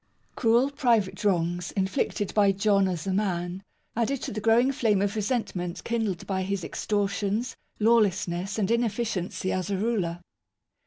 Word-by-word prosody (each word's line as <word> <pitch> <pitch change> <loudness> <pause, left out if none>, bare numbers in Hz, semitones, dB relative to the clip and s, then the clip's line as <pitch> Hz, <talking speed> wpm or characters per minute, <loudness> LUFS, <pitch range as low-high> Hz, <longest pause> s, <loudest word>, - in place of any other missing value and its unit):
Cruel 240 +4 +3
private 230 -7 +1
wrongs, 175 -2 0
inflicted 200 +1 -1
by 200 -2 +4
John 195 0 +3
as 175 -4 -3
a 190 - -1
man, 185 -2 -1 0.3
added 240 +4 0
to - - -3
the 215 - -4
growing 230 +4 +4
flame 220 -6 +2
of 200 +1 0
re 215 - 0
sentment 195 -6 -2
kindled 220 -7 -2
by 190 -1 -1
his 190 -1 -2
extortions, 205 +4 -1 0.2
lawlessness, 200 -4 +2
and 210 -1 0
inefficiency 220 -6 -1
as 185 +1 -2
a 195 - 0
ruler. 190 -6 -1
200 Hz, 150 wpm, -27 LUFS, 185-225 Hz, 0.3 s, by